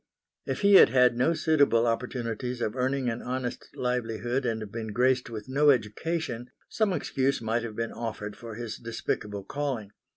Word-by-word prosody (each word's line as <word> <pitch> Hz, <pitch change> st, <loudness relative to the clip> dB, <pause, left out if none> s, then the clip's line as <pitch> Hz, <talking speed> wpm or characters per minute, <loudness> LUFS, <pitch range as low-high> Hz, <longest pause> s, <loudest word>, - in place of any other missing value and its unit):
If -, -, -2 dB
he 200 Hz, 0 st, +5 dB
had -, -, +7 dB
had 125 Hz, -2 st, +4 dB
no 130 Hz, +8 st, +2 dB
suitable 145 Hz, -8 st, +3 dB
opportunities 120 Hz, 0 st, -2 dB
of 110 Hz, -1 st, -2 dB
earning 130 Hz, 0 st, 0 dB
an 115 Hz, 0 st, -2 dB
honest 125 Hz, -1 st, -4 dB
livelihood 125 Hz, +1 st, -1 dB
and 110 Hz, -3 st, -3 dB
been 115 Hz, 0 st, -5 dB
graced 125 Hz, +1 st, +2 dB
with 110 Hz, -2 st, -7 dB
no 145 Hz, +3 st, +3 dB
education, 125 Hz, +1 st, 0 dB, 0.2 s
some 215 Hz, -3 st, +1 dB
excuse 140 Hz, -5 st, 0 dB
might 115 Hz, +1 st, 0 dB
have 115 Hz, -2 st, -6 dB
been 115 Hz, 0 st, -2 dB
offered 105 Hz, -3 st, -5 dB
for 115 Hz, -2 st, -9 dB
his 115 Hz, -1 st, -5 dB
despicable 105 Hz, -3 st, -3 dB
calling. 130 Hz, -6 st, -3 dB
120 Hz, 165 wpm, -28 LUFS, 115-130 Hz, 0.2 s, had